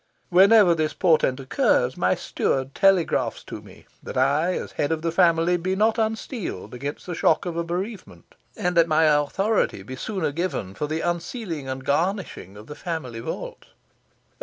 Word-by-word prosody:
Whenever 195 +1 +6
this 155 -2 -1
portent 155 -7 +2
occurs, 130 - +1
my - - +1
steward 135 0 -2
telegraphs 195 -4 +2
to - - -8
me, - - -16 0.2
that - - -7
I, 145 +7 +2
as - - -5
head 145 - -2
of 160 0 -2
the 165 - 0
family, 170 0 +3
be 185 +2 -2
not 220 +3 +2
unsteeled 220 - -3
against 140 +4 -6
the 180 - -5
shock 160 +2 +2
of 175 -2 -4
a 170 - -1
bereavement, 175 - -6 0.2
and 180 0 -1
that 170 -1 +5
my 155 0 +3
authority 155 - +1
be 130 +6 -8
sooner 185 +2 -3
given 145 - -3
for 150 - -3
the 155 +2 -2
unsealing 175 - -4
and 130 0 -5
garnishing 165 - -2
of 105 - -11
the 150 - -8
family 150 -9 -5
vault. - - -7
165 Hz, 170 wpm, -24 LUFS, 140-185 Hz, 0.2 s, Whenever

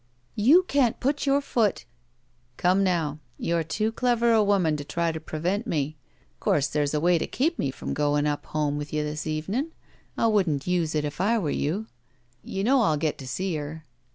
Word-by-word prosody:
"You 280 - +5
can't 275 -9 +1
put 285 +2 0
your 275 +1 +3
foot 230 -7 0 0.2
— 120 +1 -42 0.2
" 120 0 -39
"Come 185 +2 +3
now. 165 -5 0 0.2
You're 170 0 0
too 215 +7 -1
clever 235 0 +2
a 220 -2 +5
woman 190 -6 +2
to 145 - -5
try 170 +3 -1
to 160 - -5
prevent 175 +8 -2
me. 155 -4 -1 0.4
Course 145 - +2
there's 150 0 0
a - - +2
way 175 +2 +3
to - - -2
keep 325 +6 0
me 140 - 0
from 130 - -5
goin' 145 0 +1
up 145 -1 -2
home 150 -1 -1
with 145 0 -6
you 150 0 0
this 150 +1 -4
evenin'. 200 - -2 0.4
I - - +2
wouldn't 185 -11 +2
use 175 -3 0
it, 150 -1 0
if 150 +3 -4
I 225 +5 +3
were 165 -9 -1
you. 185 +10 -1 0.6
You 195 - -3
know 260 +4 +4
I'll 160 -9 +2
get 150 0 -1
to 135 - -8
see 185 +7 -2
her. 150 +2 -7
170 Hz, 210 wpm, -26 LUFS, 150-220 Hz, 0.6 s, You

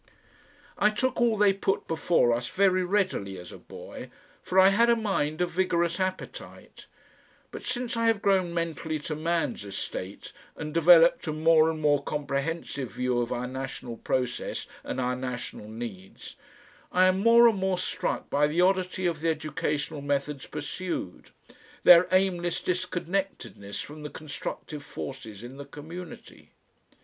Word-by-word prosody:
I 210 - +5
took 245 +4 -1
all 230 -2 +3
they 200 -1 +5
put 195 0 -1
before 160 -6 +2
us 120 +1 -2
very 185 -1 +2
readily 180 - -1
as 90 0 -10
a - - -11
boy, - - -10 0.3
for 185 - -3
I 190 +1 +8
had 230 +4 +4
a 235 - +6
mind 180 -8 -1
of 175 -1 0
vigorous 170 -1 +1
appetite, 185 0 -6 0.6
but - - -7
since 245 -1 -2
I 230 0 +1
have 225 -2 +3
grown 190 -3 +2
mentally 165 -2 -2
to 155 +1 -4
man's 165 -6 -1
estate 100 -1 -6 0.2
and 150 0 -6
developed 170 +1 +6
a - - 0
more 160 +1 +4
and 160 -1 -3
more 145 -2 +3
comprehensive 140 -1 -3
view 125 -1 0
of 120 - -3
our 125 0 -2
national 130 -2 -6
process 125 +1 -2 0.2
and - - -4
our 125 0 0
national 125 -4 -6
needs, 110 -4 -8 0.6
I 185 +1 +4
am 185 +1 +3
more 230 +3 +7
and 220 -4 +2
more 190 -1 0
struck 180 - -2
by 145 +1 +2
the 155 +3 -2
oddity 185 0 +2
of 170 -3 0
the 165 - +1
educational 150 -2 -2
methods 140 0 -2
pursued, 180 - -5 0.5
their 175 0 +8
aimless 180 -2 +1
disconnectedness 180 - -3
from 150 +1 -9
the 150 - -6
constructive 150 0 -6
forces 130 -7 -8
in 125 +3 -9
the 140 - -8
community. 160 +5 -10
165 Hz, 155 wpm, -27 LUFS, 140-185 Hz, 0.6 s, I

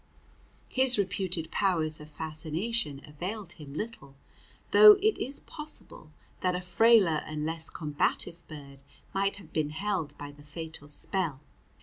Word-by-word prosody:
His 260 -2 +3
reputed 185 -4 -1
powers 160 -6 +2
of 150 0 -11
fascination 155 +2 -3
availed 185 +8 -6
him 145 -3 -11
little, 155 -10 -6 0.6
though 425 -1 +11
it 420 +2 +2
is 275 +3 0
possible 300 - -8 0.3
that 180 -1 +1
a 180 - -2
frailer 190 -4 +4
and 155 -1 -3
less 160 0 -3
combative 160 +2 -1
bird 140 -3 -11 0.3
might 195 +1 +1
have 185 -6 -15
been 155 -2 0
held 180 -1 -3
by 145 0 -7
the 145 0 -17
fatal 160 0 -8
spell. 160 -2 -1
165 Hz, 135 wpm, -29 LUFS, 150-200 Hz, 0.6 s, though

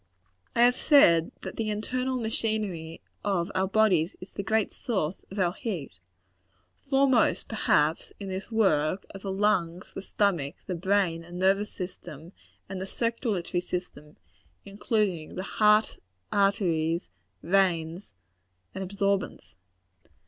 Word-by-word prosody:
I 235 - +5
have 245 +1 +5
said 170 - +5
that - - -7
the 220 -1 -1
internal 255 +5 -2
machinery 215 -8 -2 0.2
of 195 -2 0
out 190 +1 0
bodies 190 -7 +3
is 185 - -11
the - - -4
great 220 +1 0
source 190 - -2
of 195 - -9
our 180 -3 +2
heat. 170 - -5 0.9
Foremost, 270 -4 +3
perhaps, 160 -7 +1
in 200 - -6
this 190 +4 -5
work, 185 -5 +2
are 195 - -8
the 195 0 -4
lungs, 190 -4 0
the - - -5
stomach, 180 -7 0
the 185 - -3
brain 180 -2 +1
and 175 +1 -9
nervous 195 +3 +2
system, 175 -3 -8 0.4
and 190 -1 -5
the 190 - -4
circulatory 220 -6 -1
system, 175 -4 -6 0.5
including 200 -5 -1
the 185 - -3
heart, 210 +2 +3 0.3
arteries, 175 - +1 0.3
veins 175 -1 +1 0.6
and 190 - -4
absorbents. 200 0 -2
195 Hz, 125 wpm, -27 LUFS, 170-210 Hz, 0.9 s, I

